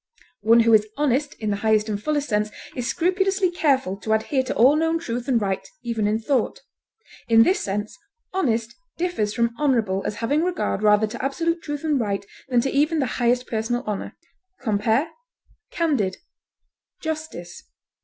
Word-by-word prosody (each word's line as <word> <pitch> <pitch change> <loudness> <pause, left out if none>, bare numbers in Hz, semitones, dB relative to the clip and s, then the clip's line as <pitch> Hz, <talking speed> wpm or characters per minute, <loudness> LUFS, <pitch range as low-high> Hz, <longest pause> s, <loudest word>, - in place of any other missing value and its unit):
One 230 +2 +6
who 230 0 +4
is 215 -1 +5
honest 290 0 +1
in 215 -2 -3
the 200 - 0
highest 215 0 +2
and 205 -1 -3
fullest 295 +2 -1
sense 210 -1 0 0.3
is 245 -2 -3
scrupulously 375 +6 +1
careful 265 - +1
to 220 +2 -1
adhere 260 +5 +1
to - - -3
all 260 +6 +6
known 325 +1 +1
truth 245 -7 -4
and 250 -4 +3
right 195 -2 -1 0.2
even 230 -3 -1
in 210 +1 +1
thought. 255 - 0 0.7
In 225 -1 +7
this 375 - +2
sense 205 +2 -3 0.4
honest 235 -11 0 0.2
differs 335 -13 -1
from 235 -1 +1
honorable 230 -10 +1
as 210 - -3
having 275 +8 0
regard 355 - -1
rather 210 0 +4
to 215 - -6
absolute 330 +5 -1
truth 295 -2 -5
and 300 -4 +1
right 200 -3 -2 0.2
than 245 -2 +3
to 270 - -1
even 300 +4 +2
the 280 - +1 0.2
highest 245 +1 +2
personal 240 +2 -2
honor. 210 -2 -4 0.4
Compare 225 +7 +1 0.6
CANDID; 255 - 0 0.8
JUSTICE. 310 - -5
240 Hz, 165 wpm, -23 LUFS, 215-300 Hz, 0.8 s, In